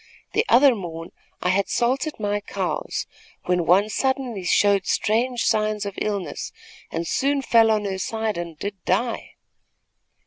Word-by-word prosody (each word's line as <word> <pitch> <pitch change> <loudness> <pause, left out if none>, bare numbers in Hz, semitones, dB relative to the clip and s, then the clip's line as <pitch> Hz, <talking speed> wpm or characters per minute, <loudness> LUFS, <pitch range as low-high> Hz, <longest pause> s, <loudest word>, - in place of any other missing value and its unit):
The 445 - +3
other 265 +2 +7
morn 165 -5 -7 0.3
I 180 - +1
had 195 +2 +1
salted 260 +5 0
my 205 -1 0
cows, 205 - -3 0.4
when 180 -2 +1
one 195 +4 +5
suddenly 255 -3 -1
showed 200 +2 +3
strange 235 +3 +1
signs 215 -1 +1
of 200 - -4
illness 200 -3 -3 0.4
and 165 +1 -3
soon 275 - 0
fell 230 -3 +5
on 215 -1 +1
her 190 -1 -3
side 220 +1 -2
and 170 -2 -6
did 200 +1 -6
die. 230 +6 -1
210 Hz, 145 wpm, -23 LUFS, 190-235 Hz, 0.4 s, other